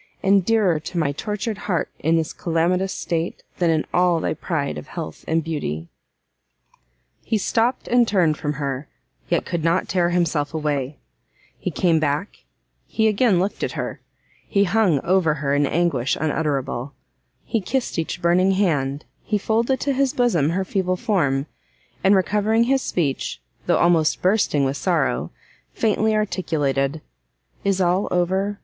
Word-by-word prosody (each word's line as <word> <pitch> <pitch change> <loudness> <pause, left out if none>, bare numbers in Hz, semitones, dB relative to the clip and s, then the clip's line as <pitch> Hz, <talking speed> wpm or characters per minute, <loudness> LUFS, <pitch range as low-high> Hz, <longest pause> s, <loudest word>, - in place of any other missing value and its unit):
and 195 0 +4
dearer 200 -6 +2
to 160 +3 -7
my 155 -4 +1
tortured 210 +6 -4
heart 175 -4 0
in 160 +2 +2
this 160 -1 -1
calamitous 180 +3 0
state, 165 0 -3 0.2
than 175 -2 +3
in 160 -1 +1
all 180 -2 +3
thy - - -1
pride 155 -2 -2
of - - -8
health 165 -3 -7
and 160 0 +1
beauty!" 85 - -4 1.3
He 225 - 0
stopt, 230 +5 0
and 245 -1 +4
turned 175 -7 +2
from 150 0 -3
her, 140 -1 -4 0.4
yet - - +1
could 170 -3 -3
not 170 +3 +1
tear 175 -2 +1
himself 165 -4 0
away; 145 -2 -2 0.6
he - - -4
came 170 -3 +2
back, 155 +6 -2 0.4
he 220 -1 +1
again 215 -2 +3
looked 195 +3 -2
at - - -2
her, - - -5 0.5
he 200 - +3
hung 190 -5 +2
over 175 -4 +2
her 140 -1 -1
in 145 0 +2
anguish 145 -6 +1
unutterable; 145 -4 -2 0.5
he 225 - -1
kissed 250 -2 -2
each 165 +2 -4
burning 185 +3 +4
hand, 150 -7 0 0.2
he 210 - -1
folded 230 +5 +1
to 280 - +1
his 270 0 +1
bosom 180 - +2
her 190 +3 -1
feeble 185 -2 -1
form, 155 - +1 0.6
and, 195 +1 +5
recovering 210 +4 +2
his 265 +2 +2
speech, 145 - -2 0.3
though - - +3
almost 170 -3 +2
bursting 185 -7 +2
with 135 +1 -1
sorrow, 135 - 0 0.4
faintly 220 0 +1
articulated, 155 -8 0 0.6
"Is 195 -2 +1
all 180 +2 +2
over? 190 +3 0
175 Hz, 155 wpm, -22 LUFS, 150-200 Hz, 1.3 s, and